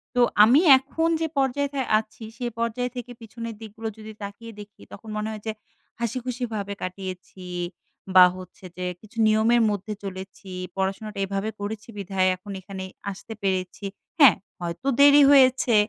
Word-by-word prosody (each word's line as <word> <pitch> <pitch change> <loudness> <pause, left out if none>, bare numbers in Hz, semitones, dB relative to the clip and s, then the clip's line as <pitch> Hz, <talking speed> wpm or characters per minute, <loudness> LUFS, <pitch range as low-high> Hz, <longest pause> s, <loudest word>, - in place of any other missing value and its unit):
তো 245 - +4 0.2
আমি 250 +8 +6 0.2
এখন 320 +5 -1
যে, 325 - +1
পর্যায়ে 275 +1 +1 0.3
আছি, 220 +1 -11
সে 250 - -4
পর্যায় 235 +2 -1
থেকে 245 0 -6
পিছনের 230 0 -7
দিকগুলো 220 +1 -7
যদি 220 0 -9
তাকিয়ে 215 +3 -8
দেখি, 205 0 -12
তখন 220 +2 -11
মনে 215 +1 -2
হয় 215 -1 -7
যে, 220 - +1 0.5
হাসিখুশিভাবে 235 -3 -3
কাটিয়েছি, 185 0 -7 0.7
বা 185 -1 +11
হচ্ছে 185 +1 -12
যে, 180 - -3 0.2
কিছু 220 +2 -17
নিয়মের 220 +2 +4
মধ্যে 205 +1 -3
চলেছি 190 0 -8 0.3
পড়াশোনাটা 195 +2 -3
এভাবে 195 +2 -2
করেছি 210 +1 -5
বিধায়, 190 -1 +1
এখন 200 +3 -11
এখানে 190 0 -7 0.3
আসতে 200 +3 -9
পেরেছি, 190 +1 -2 0.3
হ্যাঁ? 280 -7 +9 0.2
হয়তো 175 +9 -5
দেরি 285 +1 +8
হয়েছে, 260 -3 +5
215 Hz, 145 wpm, -25 LUFS, 195-240 Hz, 0.7 s, বা